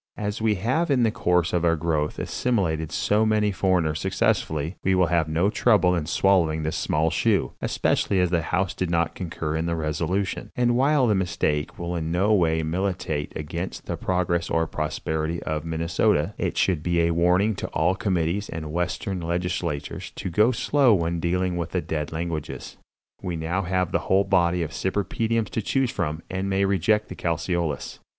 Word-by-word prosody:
As 105 0 -3
we 110 -1 +2
have 130 - 0
in 130 -4 +3
the 110 - +3
course 90 -6 +1
of 85 -1 +1
our 85 -1 +3
growth 75 -2 -1
assimilated 80 -10 -1
so 105 +4 +2
many 105 -1 +2
foreigners 90 -5 +1
successfully, 80 -3 0
we 95 0 +3
will 90 -1 +4
have 80 -2 +2
no 85 +6 +1
trouble 100 -7 +3
in 85 -4 -1
swallowing 85 -4 +2
this 80 - -2
small 80 +1 +1
shoe, - - +1
especially 95 - +1
as 90 -1 +2
the 85 -2 +2
house 90 +4 -1
did 90 - -2
not 85 -1 +1
concur 80 -3 -4
in 80 +1 -1
the 85 - 0
resolution, 85 +5 -2
and 120 -1 +2
while 135 +1 +3
the 110 - +3
mistake 90 -5 -1
will 85 0 -3
in 80 -1 -2
no 95 +5 +2
way 80 -5 +2
militate 80 -3 -2
against 85 +4 -5
the - - -3
progress 90 -2 -1
or 80 0 +1
prosperity 80 +1 -2
of 80 0 -3
Minnesota, 80 0 +1
it - - -2
should 90 -5 +2
be 85 +1 +1
a 85 0 +2
warning 90 +5 +3
to - - -5
all 90 - +1
committees 95 -2 -1
and 80 -2 -5
Western 90 +2 -2
legislators 85 -3 -3
to 95 - -4
go 105 +8 +4
slow 130 -1 +3
when 85 -1 -1
dealing 90 +1 0
with 85 - -3
the - - +1
dead 75 -2 -3
languages. 80 -1 -5 0.5
We 90 -2 -3
now 85 +4 -1
have 90 -1 -1
the - - +1
whole 95 +1 +4
body 90 -3 +2
of 75 - -5
cypripediums 110 +4 -1
to 110 - -2
choose 130 +3 0
from, 80 -3 -3
and 95 +1 -3
may 95 0 +2
reject 100 +3 +2
the - - -7
calceolous. 85 -2 -2
90 Hz, 185 wpm, -24 LUFS, 80-100 Hz, 0.5 s, will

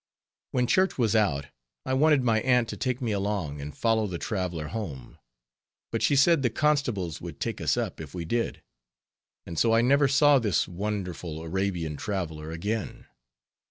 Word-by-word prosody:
When 125 -1 +1
church 185 +9 +2
was 115 -4 +2
out, 80 -11 +2 0.4
I 130 - -1
wanted 145 0 +4
my 115 -2 +3
aunt 125 -1 +3
to - - -4
take 130 0 -2
me 115 - 0
along 100 -8 -2
and 75 +1 -8
follow 110 -2 +2
the 90 -3 -4
traveler 90 -6 -3
home. 80 - -6 0.7
But - - -1
she 145 - +3
said 150 +3 +5
the 125 - +2
constables 115 - 0
would - - -8
take - - -3
us - - +1
up, - - -3
if 80 +2 -9
we 85 -2 -4
did; 115 +7 -2 0.8
and 85 - -4
so 115 -1 +4
I 115 - +5
never 140 +4 +4
saw 145 +1 +5
this 105 -6 +1
wonderful 90 -4 -4
Arabian 85 -3 -2
traveler 80 -6 -4
again. 100 +7 -4
105 Hz, 170 wpm, -27 LUFS, 85-125 Hz, 0.8 s, said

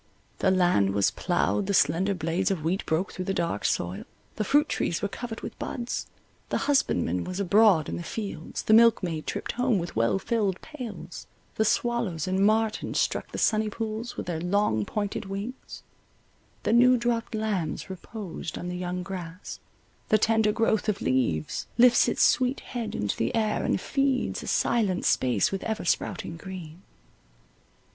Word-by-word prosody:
The 190 - +3
land 175 - +3
was 100 -1 +3
ploughed, 190 +2 0
the 200 - +1
slender 185 +6 +3
blades 170 +2 0
of 185 -6 -2
wheat 175 +4 0
broke 160 +4 0
through 185 - -4
the 195 - -1
dark 170 -12 -1
soil, 90 +3 -1 0.3
the 215 - -1
fruit 290 +8 +3
trees 170 - -1
were - - +2
covered 230 +2 -6
with - - -8
buds, 240 -1 -4 0.4
the - - 0
husbandman 90 - +1
was 185 +1 -5
abroad 200 -4 +4
in - - -3
the - - -5
fields, 195 -2 -5
the 220 - +3
milk 230 -2 +6
maid 160 -3 -3
tripped - - -3
home 250 -3 +1
with 175 -1 -4
well 115 +9 +2
filled 195 -2 -1
pails, 215 - -8 0.3
the 220 - +1
swallows 220 -8 0
and 190 +1 +1
martins 215 +1 +1
struck - - -1
the - - -5
sunny 215 -1 +2
pools 220 +2 -5
with - - -4
their 165 -2 -3
long, 175 - +1
pointed 205 - -3
wings, 200 +7 -7 0.8
the 215 - +1
new 250 +2 +6
dropped 235 -1 -1
lambs 205 -8 -2
reposed 190 -3 -7
on 180 - -5
the 180 - -4
young 180 0 -3
grass, 180 -1 -7 0.5
the 215 - +5
tender 220 0 +3
growth 220 0 +1
of 205 - 0
leaves— 115 -13 0
Lifts 245 0 +6
its - - +2
sweet 255 +1 +3
head 235 -3 -5
into 105 -1 -1
the 115 - -1
air, 215 -2 +1
and - - +1
feeds 275 -2 0
A - - -8
silent 200 -6 +1
space 125 -6 +2
with 195 0 -3
ever 220 -3 -3
sprouting 170 -1 -1
green. 180 -2 -9
195 Hz, 170 wpm, -27 LUFS, 170-225 Hz, 0.8 s, milk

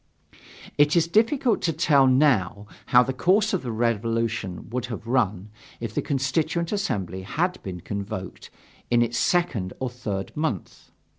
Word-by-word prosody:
It 150 +2 +5
is 165 -1 +3
difficult 225 - +2
to 170 - +1
tell 145 -4 +4
now 125 -8 +2 0.2
how 125 0 +6
the 130 - -3
course 195 +11 +2
of 190 - 0
the 125 - -4
Revolution 115 -4 -1
would 125 0 -2
have 115 -2 -6
run 105 -5 0 0.3
if 115 -2 -5
the - - 0
Constituent 155 +5 -1
Assembly 100 - -2
had 175 - -2
been 90 -2 -7
convoked 100 -1 -6 0.4
in 120 -1 +4
its 120 0 -2
second 120 - 0
or 130 -2 -3
third 105 -6 -5
month. 150 - -4
125 Hz, 150 wpm, -25 LUFS, 105-160 Hz, 0.4 s, how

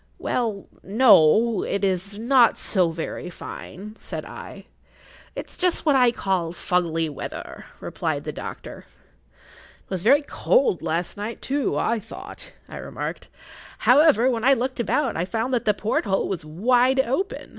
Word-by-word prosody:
"Well, 220 -5 -2 0.2
no—it 210 -1 +4
is 195 +1 -1
not 240 +1 +4
so 185 -4 +1
very 165 +2 -5
fine," 205 +3 -9
said - - -6
I. - - -10 0.7
"It's - - -7
just 360 -2 0
what 295 -3 +4
I 250 -2 +5
call 185 -7 -1
fuggly 165 -2 0
weather," 145 - -7
replied - - -3
the - - -4
doctor. - - -8 0.4
"It - - -24
was 185 -3 -3
very 280 - +4
cold - - +1
last 165 +3 -2
night, 215 +3 -6
I 270 -4 0
thought," 215 - -11 0.2
I - - -9
remarked. - - -6 0.5
"However, 265 -2 +5
when 235 -3 0
I 270 +2 +5
looked 255 +1 -3
about, 260 +2 0
I 165 - 0
found 230 +6 -2
that 245 - 0
the 210 - +4
porthole 205 -2 0
was 185 -5 -4
wide 245 +11 +2
open. 270 - -1
225 Hz, 145 wpm, -23 LUFS, 185-255 Hz, 0.7 s, I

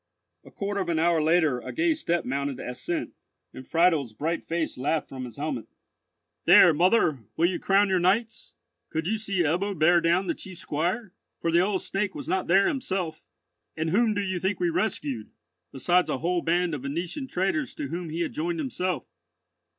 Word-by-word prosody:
A - - -14
quarter 200 -2 -3
of 180 - -3
an 165 - +1
hour 165 0 +3
later, 155 -5 +3
a - - -7
gay 325 0 +2
step 175 - -1
mounted 140 +1 -2
the - - -7
ascent, 315 - -4 0.4
and 130 - -10
Friedel's 165 -8 +2
bright 165 +8 -2
face 165 -1 -2
laughed 145 +5 -1
from 130 -1 -6
his 120 - -10
helmet: 140 -7 -3 0.8
"There, 170 - +8
mother, 175 - +3 0.2
will 165 - +3
you 180 +1 0
crown 200 +1 +3
your 190 -1 +2
knights? 210 +6 0 0.3
Could 160 0 -2
you 215 +4 0
see 195 -4 0
Ebbo 180 +5 0
bear 170 +3 +5
down 170 +3 +2
the 170 - 0
chief 185 +1 -9
squire? 180 +7 -2 0.3
for 165 - 0
the 170 - +4
old 190 +1 +1
Snake 195 0 -2
was - - -7
not 190 0 0
there 195 +3 +5
himself. 190 - -2 0.6
And 160 0 -1
whom 220 +2 +3
do 205 - 0
you 185 -2 -2
think 190 +2 -1
we 175 -1 +1
rescued, 140 - -2 0.4
besides 175 +7 +2
a - - 0
whole 175 +5 0
band 175 0 +1
of 145 - -3
Venetian 170 - -4
traders 255 - -1
to 140 - -4
whom 170 +1 -4
he 165 +2 -3
had 170 - -2
joined 170 +2 -2
himself? 185 -5 -2
175 Hz, 195 wpm, -26 LUFS, 155-195 Hz, 0.8 s, There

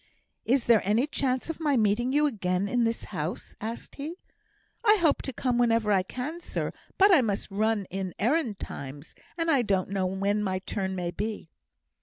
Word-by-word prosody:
"Is 255 +1 +2
there 230 -3 +5
any 215 +7 +2
chance 260 -4 -1
of 325 -1 -4
my 295 -4 +2
meeting 220 +3 +2
you 295 +2 +3
again 195 -7 0
in 240 +2 +2
this 230 0 -1
house?" - - -4
asked 225 +2 -6
he. 300 +4 -5 0.7
"I 425 -2 +6
hope 335 -7 +3
to 270 - -4
come 250 -1 0
whenever 230 -3 +3
I 195 -2 +4
can, 255 - -5
sir; - - -3 0.2
but 395 0 +6
I 315 - +7
must 205 -4 -2
run 215 0 +1
in 190 -1 -4
errand 240 - +1
times, 140 -1 -7 0.2
and 330 -1 +1
I 275 -4 +4
don't 195 -5 0
know 195 -1 0
when 200 +2 0
my 190 -2 0
turn 190 0 -3
may 175 -1 -2
be." 210 -4 -5
225 Hz, 190 wpm, -28 LUFS, 195-270 Hz, 0.7 s, I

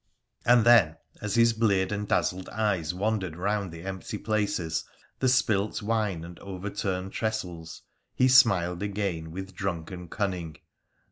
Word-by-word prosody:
' - - -37
And 120 -2 +6
then, 105 -10 +6 0.2
as 105 -2 -2
his 115 0 +5
bleared 100 -4 +2
and 105 0 -2
dazzled 95 -1 0
eyes 100 -7 0
wandered 95 -2 -1
round 100 +1 -1
the 85 0 -9
empty 95 -2 -5
places, 100 -7 -1 0.4
the 130 - +3
spilt 110 -5 +2
wine 105 -6 0
and 85 +1 -10
overturned 95 0 -4
trestles, 90 -7 -4 0.3
he 130 - +4
smiled 100 -9 +5
again 100 -5 -2
with 95 +3 -7
drunken 90 -2 -4
cunning. 90 -6 -3
95 Hz, 140 wpm, -27 LUFS, 90-110 Hz, 0.4 s, And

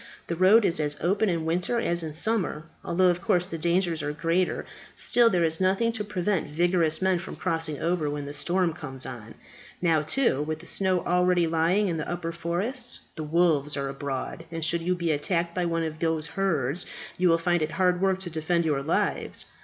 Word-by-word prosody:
"The 170 - -3
road 195 +5 +6
is 165 - +2
as 150 -1 -1
open 200 +5 +1
in 165 -3 -1
winter 180 +8 0
as 175 -6 0
in 160 -2 -5
summer, 170 -3 +1 0.2
although, 180 +2 +3
of 175 0 0
course, 180 0 +2
the 165 -3 -6
dangers 170 0 +1
are 145 0 -2
greater. 165 +4 0 0.3
Still, 240 -1 +3
there 180 -5 +2
is 160 +1 0
nothing 195 +5 +2
to 225 -2 -3
prevent 200 -4 -1
vigorous 165 +1 +1
men 190 -2 +2
from 185 - -7
crossing 165 -4 -2
over 165 -3 0
when 145 0 -4
the 145 - -6
storms 170 +3 0
come 135 -3 -7
on. 115 -3 -8 0.4
Now, 165 -3 +2
too, 155 - +1
with 155 +1 -2
the 165 - -13
snow 185 -2 0
already 180 0 +3
lying 165 +5 +2
in 170 -3 -1
the 155 - -4
upper 175 -1 -3
forests, 195 +10 -3
the 160 - -5
wolves 155 -2 +1
are 140 0 -2
abroad, 135 +3 -5
and 165 -1 -3
should 170 +1 +1
you 180 +2 0
be 170 -2 -1
attacked 170 +3 -1
by 180 -1 -1
one 165 0 0
of 155 -1 -4
those 160 -1 -1
herds, 165 -4 -1 0.3
you 180 -1 +4
will 165 - +5
find 175 0 +1
it 155 0 -2
hard 180 -1 +2
work 190 -1 +2
to 175 -2 -4
defend 165 +2 0
your 145 -3 +1
lives. 150 - -1
170 Hz, 210 wpm, -26 LUFS, 155-180 Hz, 0.4 s, road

